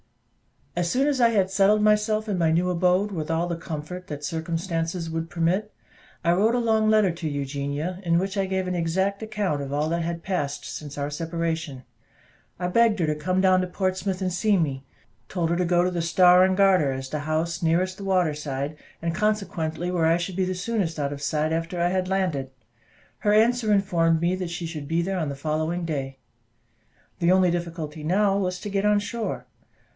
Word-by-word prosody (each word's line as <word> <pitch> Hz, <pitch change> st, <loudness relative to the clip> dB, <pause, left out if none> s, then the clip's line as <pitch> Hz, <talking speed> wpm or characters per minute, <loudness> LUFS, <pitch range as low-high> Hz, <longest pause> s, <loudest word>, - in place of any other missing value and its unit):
As 175 Hz, 0 st, 0 dB
soon 265 Hz, +6 st, +2 dB
as 275 Hz, -3 st, +1 dB
I 235 Hz, -, +6 dB
had 195 Hz, -4 st, +1 dB
settled 200 Hz, +2 st, +4 dB
myself 215 Hz, +1 st, +2 dB
in 200 Hz, -3 st, -1 dB
my 165 Hz, -2 st, +2 dB
new 175 Hz, +3 st, +2 dB
abode, 180 Hz, +3 st, +2 dB
with 160 Hz, -5 st, -4 dB
all 165 Hz, +1 st, +1 dB
the 170 Hz, -1 st, -3 dB
comfort 165 Hz, +3 st, -6 dB
that 145 Hz, -1 st, -6 dB
circumstances 165 Hz, +1 st, -3 dB
would 165 Hz, 0 st, -3 dB
permit, 175 Hz, +5 st, 0 dB, 0.5 s
I 170 Hz, -, +3 dB
wrote 210 Hz, +7 st, +3 dB
a -, -, +2 dB
long 220 Hz, -2 st, +2 dB
letter 215 Hz, -4 st, +4 dB
to 165 Hz, -1 st, -4 dB
Eugenia, 145 Hz, +5 st, -3 dB
in 170 Hz, -1 st, +2 dB
which 190 Hz, +3 st, -1 dB
I 195 Hz, -1 st, 0 dB
gave 190 Hz, -1 st, -1 dB
an 180 Hz, -, -1 dB
exact 190 Hz, +4 st, 0 dB
account 210 Hz, -9 st, -2 dB
of 140 Hz, -1 st, -5 dB
all 150 Hz, +2 st, 0 dB
that 170 Hz, +1 st, 0 dB
had 170 Hz, 0 st, -4 dB
passed 150 Hz, -7 st, -2 dB
since 145 Hz, -1 st, -7 dB
our 145 Hz, 0 st, -2 dB
separation; 160 Hz, -3 st, -3 dB, 0.7 s
I 180 Hz, -, -2 dB
begged 225 Hz, +3 st, +3 dB
her 170 Hz, -, +2 dB
to 155 Hz, -1 st, 0 dB
come 185 Hz, +5 st, 0 dB
down 185 Hz, -1 st, +4 dB
to 185 Hz, -, -2 dB
Portsmouth 185 Hz, +1 st, -2 dB
and 185 Hz, -1 st, -1 dB
see 205 Hz, +2 st, +2 dB
me; 140 Hz, -6 st, -1 dB, 0.5 s
told 170 Hz, -3 st, -1 dB
her -, -, +2 dB
to 180 Hz, -, +1 dB
go 175 Hz, 0 st, +3 dB
to 180 Hz, -, 0 dB
the 175 Hz, -1 st, -1 dB
"Star 180 Hz, +2 st, +6 dB
and 190 Hz, 0 st, +1 dB
Garter," 185 Hz, -8 st, +4 dB
as 130 Hz, 0 st, -6 dB
the 150 Hz, -, -3 dB
house 160 Hz, +3 st, -2 dB
nearest 180 Hz, +3 st, +1 dB
the 200 Hz, -, -7 dB
water 180 Hz, -5 st, +2 dB
side, 145 Hz, 0 st, -4 dB, 0.3 s
and 165 Hz, 0 st, 0 dB
consequently 180 Hz, -4 st, -1 dB
where 170 Hz, -3 st, +2 dB
I 165 Hz, +1 st, +4 dB
should 175 Hz, +1 st, -4 dB
be 190 Hz, -, +2 dB
the 185 Hz, 0 st, -2 dB
soonest 180 Hz, -4 st, -2 dB
out 145 Hz, -1 st, -1 dB
of 140 Hz, -, -8 dB
sight 155 Hz, +1 st, 0 dB
after 165 Hz, +2 st, -2 dB
I 175 Hz, +1 st, +2 dB
had 185 Hz, 0 st, 0 dB
landed. 180 Hz, -9 st, -1 dB, 0.7 s
Her 210 Hz, -, +2 dB
answer 225 Hz, +1 st, +3 dB
informed 170 Hz, -5 st, +2 dB
me 175 Hz, +2 st, +1 dB
that 180 Hz, -2 st, -4 dB
she 170 Hz, 0 st, -4 dB
should 155 Hz, -3 st, -6 dB
be 165 Hz, +2 st, +1 dB
there 190 Hz, +1 st, -2 dB
on 155 Hz, -4 st, -1 dB
the 140 Hz, -, -4 dB
following 155 Hz, +4 st, -2 dB
day. 135 Hz, -4 st, -3 dB, 1.0 s
The 170 Hz, +1 st, +3 dB
only 185 Hz, -1 st, +4 dB
difficulty 165 Hz, -3 st, -4 dB
now 195 Hz, +4 st, +2 dB
was 180 Hz, -2 st, -1 dB
to 205 Hz, -, -5 dB
get 200 Hz, 0 st, 0 dB
on 210 Hz, 0 st, +4 dB
shore. 220 Hz, +2 st, -3 dB
175 Hz, 210 wpm, -25 LUFS, 160-190 Hz, 1.0 s, I